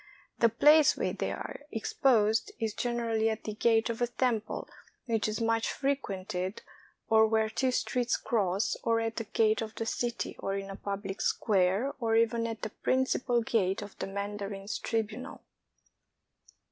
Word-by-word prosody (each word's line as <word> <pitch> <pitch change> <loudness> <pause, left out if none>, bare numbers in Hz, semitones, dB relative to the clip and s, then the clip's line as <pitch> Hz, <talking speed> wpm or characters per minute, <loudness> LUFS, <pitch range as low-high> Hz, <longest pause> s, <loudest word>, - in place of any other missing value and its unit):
The 230 - +5
place 295 +6 +6
where - - -1
they - - -2
are - - -6
exposed 225 -1 +2
is 220 -2 -1
generally 230 -2 0
at 220 0 -3
the 215 - -4
gate 225 +1 +3
of 230 0 -4
a 240 - +3
temple 235 -3 -1 0.4
which 225 -3 0
is 215 0 -2
much 225 0 +1
frequented, 195 -8 -2 0.4
or 220 0 +5
where 220 0 +1
two 260 +3 +1
streets 250 -1 0
cross, 200 -2 0
or 230 0 +2
at 225 0 -2
the 230 - -2
gate 220 +1 +2
of 220 -1 -5
the 225 - -3
city, 235 +1 -2
or 195 - -2
in 195 0 -4
a - - -6
public 200 0 -5
square, 200 +5 +2
or 225 -2 +1
even 230 0 +2
at 225 -1 -6
the 215 - -3
principal 255 -2 +1
gate 205 -3 0
of 205 - -10
the - - -3
mandarin's 200 +1 -4
tribunal. 225 +4 -3
225 Hz, 160 wpm, -30 LUFS, 205-235 Hz, 0.4 s, place